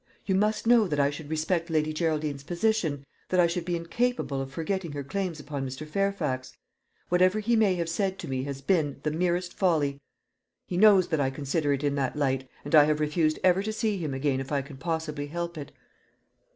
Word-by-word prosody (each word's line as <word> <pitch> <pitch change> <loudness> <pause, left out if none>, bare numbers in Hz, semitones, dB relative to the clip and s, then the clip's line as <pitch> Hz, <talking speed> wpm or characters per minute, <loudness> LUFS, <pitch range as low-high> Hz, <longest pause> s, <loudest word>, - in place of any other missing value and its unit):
"You 190 - +1
must 210 +4 +1
know 230 -3 +5
that 150 -4 -1
I 140 0 +3
should 145 0 -8
respect 160 +2 -1
Lady 155 -1 +1
Geraldine's 155 -3 -1
position 170 -5 0 0.2
that 185 - +2
I 175 - +6
should 170 0 -2
be 175 0 -1
incapable 170 - -1
of 135 0 -6
forgetting 170 +1 -3
her 145 -1 -4
claims 185 +1 -3
upon 145 -2 -5
Mr. 130 +3 -6
Fairfax. 155 -8 -2 0.5
Whatever 185 +3 +3
he 230 +3 +1
may 210 -4 +3
have 170 -2 -2
said 190 +3 -1
to - - -7
me 130 -1 -2
has 140 -1 -5
been, 150 -2 +1
the 150 - 0
merest 175 +2 0
folly. 150 -7 +1 0.6
He 180 - -5
knows 195 -1 +6
that 160 -3 0
I 135 - +2
consider 145 +2 -1
it 140 0 0
in 145 -1 +1
that 135 0 -1
light, 135 -3 -1 0.2
and 145 - -6
I 150 -2 +8
have 150 0 +1
refused 155 +1 +1
ever 185 +1 +4
to 215 +2 -2
see 215 -2 -1
him 150 -5 -3
again 135 -1 0
if 135 +1 -6
I 140 -2 0
can 140 0 -11
possibly 160 -2 -3
help 170 +2 -4
it." 145 -3 -7
160 Hz, 210 wpm, -27 LUFS, 145-185 Hz, 0.6 s, I